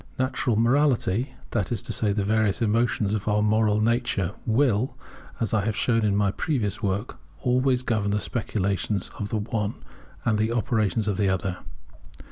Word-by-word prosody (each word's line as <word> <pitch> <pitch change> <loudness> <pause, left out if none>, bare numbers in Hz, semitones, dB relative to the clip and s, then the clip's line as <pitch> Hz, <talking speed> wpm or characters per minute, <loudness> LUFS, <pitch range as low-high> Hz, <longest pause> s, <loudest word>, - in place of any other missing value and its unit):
Natural 130 -2 0
morality, 125 -1 +2 0.2
that 100 -3 -1
is 115 -4 -1
to - - -3
say 105 -2 +1
the 100 0 0
various 110 -1 +1
emotions 110 -2 +1
of 105 -1 -3
our 105 0 +2
moral 105 0 +3
nature, 115 -5 +1
will, 120 0 +2 0.4
as 115 - -1
I 105 -2 +2
have 110 0 -1
shown 115 0 +2
in 100 -2 +2
my 100 -1 +2
previous 115 -6 -2
work, 100 -2 -2 0.2
always 125 0 +2
govern 110 -5 0
the 105 +1 +1
speculations 100 -3 -2
of 105 - -3
the 110 - -1
one 105 0 -3 0.4
and 110 -3 +2
the 110 +2 +1
operations 110 -2 0
of 100 - 0
the 100 -2 +2
other. 95 -1 -1
110 Hz, 170 wpm, -25 LUFS, 100-120 Hz, 0.4 s, moral